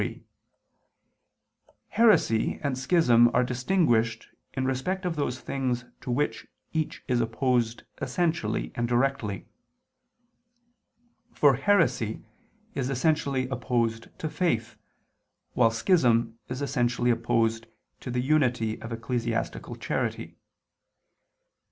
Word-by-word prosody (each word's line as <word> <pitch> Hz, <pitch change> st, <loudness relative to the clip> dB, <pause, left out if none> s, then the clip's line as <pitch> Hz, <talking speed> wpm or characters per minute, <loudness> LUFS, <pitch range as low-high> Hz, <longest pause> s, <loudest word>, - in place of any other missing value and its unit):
3: -, -, -4 dB, 1.7 s
Heresy 210 Hz, -, +3 dB
and 140 Hz, -3 st, 0 dB
schism 125 Hz, -4 st, +4 dB
are -, -, +4 dB
distinguished 120 Hz, -4 st, +1 dB, 0.2 s
in 130 Hz, -1 st, -1 dB
respect 180 Hz, +9 st, -2 dB
of 175 Hz, -2 st, -1 dB
those 130 Hz, -4 st, -2 dB
things 125 Hz, -3 st, -2 dB
to -, -, -8 dB
which 135 Hz, +5 st, -1 dB, 0.3 s
each 160 Hz, -1 st, -2 dB
is 125 Hz, -2 st, +2 dB
opposed 120 Hz, 0 st, 0 dB, 0.2 s
essentially 155 Hz, -6 st, -1 dB
and 120 Hz, 0 st, -1 dB
directly. 120 Hz, -5 st, 0 dB, 1.9 s
For 145 Hz, -2 st, +5 dB
heresy 140 Hz, -, +1 dB, 0.5 s
is 130 Hz, -1 st, -2 dB
essentially 140 Hz, -2 st, +1 dB
opposed 115 Hz, -2 st, -1 dB
to 155 Hz, -, -3 dB
faith, 150 Hz, -9 st, -1 dB, 0.8 s
while 115 Hz, -2 st, +4 dB
schism 115 Hz, -3 st, +2 dB
is 125 Hz, +3 st, -3 dB
essentially 125 Hz, -3 st, +1 dB
opposed 115 Hz, -1 st, 0 dB, 0.3 s
to -, -, -7 dB
the 125 Hz, 0 st, 0 dB
unity 125 Hz, -6 st, +1 dB
of 115 Hz, -, -7 dB
ecclesiastical 115 Hz, +1 st, -3 dB
charity. -, -, -3 dB
125 Hz, 100 wpm, -27 LUFS, 115-140 Hz, 1.9 s, For